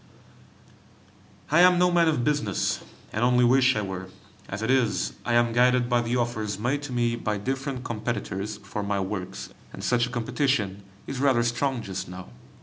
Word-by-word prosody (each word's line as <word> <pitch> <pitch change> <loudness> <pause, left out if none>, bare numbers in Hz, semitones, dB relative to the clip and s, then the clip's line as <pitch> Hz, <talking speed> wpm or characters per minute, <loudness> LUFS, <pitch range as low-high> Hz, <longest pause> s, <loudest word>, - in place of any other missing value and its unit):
I 155 - +5
am 180 0 +7
no 180 0 +4
man 170 -1 +4
of 150 -6 +1
business, 145 -8 0 0.3
and 110 - 0
only 125 0 +4
wish 130 +1 +4
I 105 - -1
were; 95 -1 -5 0.4
as 100 +3 -4
it 115 - +1
is, 125 -6 +1
I 120 - 0
am 120 -1 +3
guided 125 0 +3
by 120 -1 +3
the 120 +1 -1
offers 110 -4 -1
made 125 +7 -1
to - - -7
me 120 -1 +1
by 105 -2 -2
different 135 +3 -3
competitors 110 -3 -3
for 100 +1 -6
my 100 0 -1
works, 95 -1 -4 0.2
and - - -9
such 125 -1 +2
a - - -8
competition 120 -4 -1 0.2
is 135 - -5
rather 130 -4 +3
strong 120 +1 -1
just 95 -2 -5
now. 90 -5 -9
120 Hz, 180 wpm, -26 LUFS, 105-130 Hz, 0.4 s, am